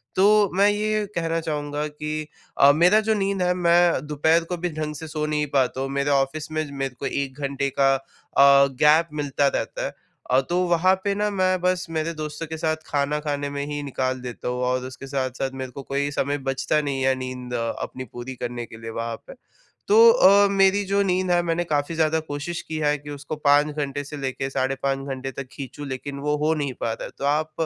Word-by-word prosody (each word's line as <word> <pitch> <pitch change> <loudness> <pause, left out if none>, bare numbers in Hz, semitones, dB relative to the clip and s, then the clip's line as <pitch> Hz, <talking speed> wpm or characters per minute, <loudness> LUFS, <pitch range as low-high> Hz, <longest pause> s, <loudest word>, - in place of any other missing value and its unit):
तो 205 +1 +5
मैं 200 +2 +5
ये 215 +1 0
कहना 165 -1 0
चाहूँगा 150 -1 -3
कि 150 +1 -5 0.3
अ, 140 - +8
मेरा 180 +6 +5
जो - - +5
नींद 195 -1 -1
है, 180 0 +2
मैं 175 -4 +3
दोपहर 160 +3 +2
को 180 - -2
भी 175 +1 -2
ढंग 150 0 -4
से 160 +2 -7
सो 155 0 -3
नहीं 150 0 0
पाता 130 -1 +1
हूँ, 135 - -2
मेरे 140 +1 -1
ऑफिस 140 +3 0
में 155 0 -1
मेरे 135 -2 -4
को - - -4
1 140 0 -3
घंटे 140 0 -1
का 135 0 +5
अ, 135 - -6 0.8
गैप 155 +3 +5
मिलता 140 0 +1
रहता - - -2
है। - - -4 0.4
अ, 130 - +5
तो 175 - +1
वहाँ 175 +2 +4
पे 200 - +1
ना 210 +1 0
मैं 185 -1 +1
बस 180 0 +1
मेरे 160 +1 -2
दोस्तों 155 0 -5
के 160 +1 -5
साथ 155 0 0
खाना 145 +1 0
खाने 145 -1 -3
में 140 0 -4
ही 145 0 -3
निकाल 130 -2 -2
देता 125 -1 -6
हूँ 125 0 -2
और 125 0 0
उसके 130 +1 -9
साथ-साथ 135 -1 -2
मेरे 130 -1 -5
को 135 +2 -8
कोई 140 +2 -1
समय 145 0 -1
बचता 135 +3 +1
नहीं 140 -2 -2
है, 130 0 +3
नींद 130 -1 -6
अपनी 115 +2 -4
पूरी 125 +2 -6
करने 120 -1 -5
के 110 - -12
लिए 115 - -6
वहाँ 115 0 -3
पे - - -9 0.5
तो 450 +3 +8
अ, 200 - +6
मेरी 195 +1 +4
जो 200 +1 +1
नींद 185 -1 0
है, 175 0 +4
मैंने 170 0 0
काफ़ी 150 -1 -1
ज़्यादा 160 0 +2
कोशिश 145 +4 -4
की 160 - -3
है 150 -1 +2
कि 145 +1 -12
उसको 145 +1 -6
5 145 0 +3
घंटे 145 -1 -3
से 145 +1 -8
लेके, 135 -1 -3
साढ़े 135 0 -1
5 135 0 -1
घंटे 135 0 -4
तक 135 0 -7
खींचूँ 140 +1 -7
लेकिन 140 +2 -5
वो 150 - +2
हो 160 - +3
नहीं 145 -3 -2
पा 115 - 0
रहा - - -7
है। - - -7
तो 140 - -2
आप 155 +2 +1
150 Hz, 220 wpm, -24 LUFS, 135-165 Hz, 0.8 s, अ